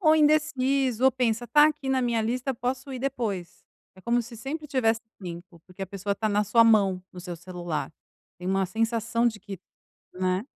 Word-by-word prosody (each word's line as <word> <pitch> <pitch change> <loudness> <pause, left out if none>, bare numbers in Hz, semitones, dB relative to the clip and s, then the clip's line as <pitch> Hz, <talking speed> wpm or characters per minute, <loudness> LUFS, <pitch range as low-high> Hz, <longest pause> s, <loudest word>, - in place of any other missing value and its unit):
Ou 315 -4 +5
indeciso, 275 -5 +2
ou 265 - +6
pensa: 240 -2 0
"Tá 295 +6 +6
aqui 300 -3 -2
na 265 -1 +2
minha 235 -2 +1
lista, 250 +4 -1
posso 255 +3 -3
ir 255 - -4
depois". 230 -9 -3 0.3
É - - -14
como 240 +4 +1
se 235 +1 -11
sempre 295 +7 -5
tivesse 230 -6 +1 0.2
limpo, 175 -1 -8
porque 185 +1 -9
a - - -3
pessoa 200 +1 -3
tá 215 +2 -1
na 210 0 +2
sua 230 +3 +5
mão, 200 -5 +4
no 180 - -9
seu 175 -1 -6
celular. 175 -2 -5 0.5
Tem 180 - -7
uma 195 +1 +2
sensação 225 +3 0
de 220 -3 -1
que 195 -2 -8 0.6
né. 185 +2 0
230 Hz, 195 wpm, -26 LUFS, 195-260 Hz, 0.6 s, ou